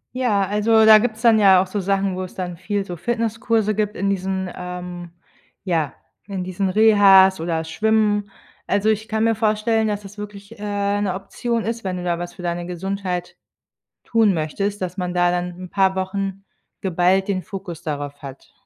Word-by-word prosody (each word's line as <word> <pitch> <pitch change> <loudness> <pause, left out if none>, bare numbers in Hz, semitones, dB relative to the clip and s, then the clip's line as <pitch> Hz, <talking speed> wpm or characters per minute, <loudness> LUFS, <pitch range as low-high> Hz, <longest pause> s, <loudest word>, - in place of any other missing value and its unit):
Ja, 215 -6 +1
also, 220 +2 +3
da 215 -1 +9
gibt's 225 0 -3
dann 225 -2 +6
ja 190 -3 +7
auch - - -1
so 195 +2 -4
Sachen, 195 0 0
wo 185 - -4
es 185 - -9
dann 180 -2 -4
viel 195 +3 -3
so 175 - -6
Fitnesskurse 225 -1 0
gibt 210 0 -1
in 200 +1 0
diesen 190 0 -2
ähm, 180 -1 -7 0.5
ja, 165 -7 -1 0.3
in 195 -3 -4
diesen 185 +1 -2
Rehas 195 -3 +6
oder 165 -1 -1
Schwimmen. 210 +3 +1 0.4
Also, 205 +2 +1
ich 220 0 0
kann 220 0 -1
mir 230 0 +3
vorstellen, 220 0 +1
dass 205 -1 -2
das 205 +1 -11
wirklich, 205 +1 -9
äh, 205 0 -1
’ne 190 -3 -1
Option 230 +4 -3
ist, 230 0 -3
wenn 185 -1 -3
du 180 - -5
da 175 -1 -1
was 175 0 -6
für 180 - -10
deine 175 0 -3
Gesundheit 180 0 -4 0.7
tun 220 -4 +3
möchtest, 195 +6 -2
dass 185 +1 -4
man 180 -1 -2
da 175 0 +3
dann 180 0 -1
’n 180 - -8
paar 190 -1 +2
Wochen 195 +1 -3 0.4
geballt 185 +1 +2
den 190 -3 -1
Fokus 185 -5 -8
darauf 145 -2 -5
hat. 135 0 -10
195 Hz, 185 wpm, -21 LUFS, 180-210 Hz, 0.7 s, da